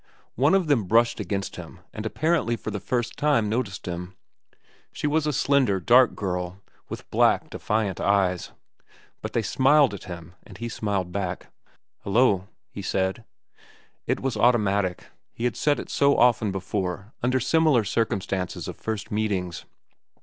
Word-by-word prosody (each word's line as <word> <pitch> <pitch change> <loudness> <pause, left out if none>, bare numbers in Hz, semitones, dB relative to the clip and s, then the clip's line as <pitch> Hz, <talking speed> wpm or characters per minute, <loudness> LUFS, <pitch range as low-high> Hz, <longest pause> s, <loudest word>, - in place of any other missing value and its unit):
One 145 - +3
of 190 -2 +2
them 140 -9 +2
brushed 115 +5 +3
against 100 -1 -3
him - - -10
and 110 +1 -4
apparently 145 -4 +1
for 110 - -6
the 100 - -3
first 120 +2 -2
time 145 -8 +2
noticed 110 -3 -2
him. 90 +1 -5 0.8
She - - -5
was 150 +1 +1
a - - +2
slender, 135 -8 +2
dark 120 +6 +5
girl, 90 -1 -3 0.3
with - - -7
black, - - +3
defiant 105 -4 -1
eyes. 95 -3 +1 0.7
But - - -6
they 115 - +1
smiled 135 +4 +4
at 100 - -8
him, 85 -1 -9
and - - -14
he 120 0 -4
smiled 100 -5 -2
back. 95 -1 -4 0.5
"Hello," 100 -3 +2 0.2
he 100 - -7
said. 95 +3 -1 0.8
It - - 0
was 135 -3 -1
automatic; 100 -6 +2 0.3
he 115 - -7
had 120 -2 0
said 145 -1 +1
it - - -7
so 140 0 +3
often 120 -4 +3
before 95 +1 -4
under 125 +2 +2
similar 155 -2 +3
circumstances 100 -3 -2
of - - -6
first 110 -2 -4
meetings. 100 -5 -2
110 Hz, 155 wpm, -25 LUFS, 95-125 Hz, 0.8 s, dark